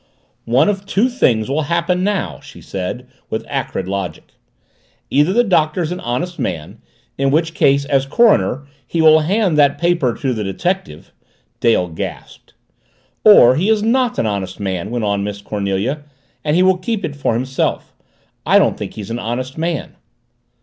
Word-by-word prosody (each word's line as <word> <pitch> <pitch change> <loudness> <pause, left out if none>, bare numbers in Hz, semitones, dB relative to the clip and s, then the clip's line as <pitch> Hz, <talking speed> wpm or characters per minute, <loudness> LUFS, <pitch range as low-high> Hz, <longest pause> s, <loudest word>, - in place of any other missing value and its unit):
"One 125 - +4
of 195 -1 -2
two 215 +6 +2
things 120 - +1
will 145 +4 0
happen 170 +2 0
now," 205 -1 -1
she - - -13
said, 95 +6 -5 0.2
with - - -3
acrid, 95 - -3
logic. 95 -5 -5 0.8
"Either 145 +6 +3
the 240 +5 +3
Doctor's 165 -4 +1
an 180 - -4
honest 170 +9 -3
man 85 +8 -4 0.4
in 135 0 +2
which 165 +3 +1
case, 140 -2 +2
as 135 -2 +1
coroner, 145 - +3 0.2
he 170 - -3
will 160 -1 +7
hand 180 0 +1
that 145 -1 +4
paper 170 -8 +1
to 135 -3 -2
the 110 -2 -3
detective 140 - -3 0.3
" - - -44
Dale 110 -6 +2
gasped. 80 -2 -8 0.7
"Or 130 - +8
he 180 +9 +1
is 215 -1 +2
not 245 +2 +1
an - - 0
honest 100 -3 -3
man," 95 -1 -3
went 120 -2 -2
on 100 -1 0
Miss 100 0 -4
Cornelia, 100 +7 -2 0.4
"and 150 0 +1
he 180 - +4
will 185 0 +4
keep 215 +2 -2
it 145 - -5
for 140 -5 -1
himself. 130 +3 -2 0.5
I - - +4
don't - - +2
think - - -6
he's 105 0 -7
an 120 - -3
honest 125 +3 -4
man." 165 -1 -3
140 Hz, 170 wpm, -18 LUFS, 110-180 Hz, 0.8 s, Or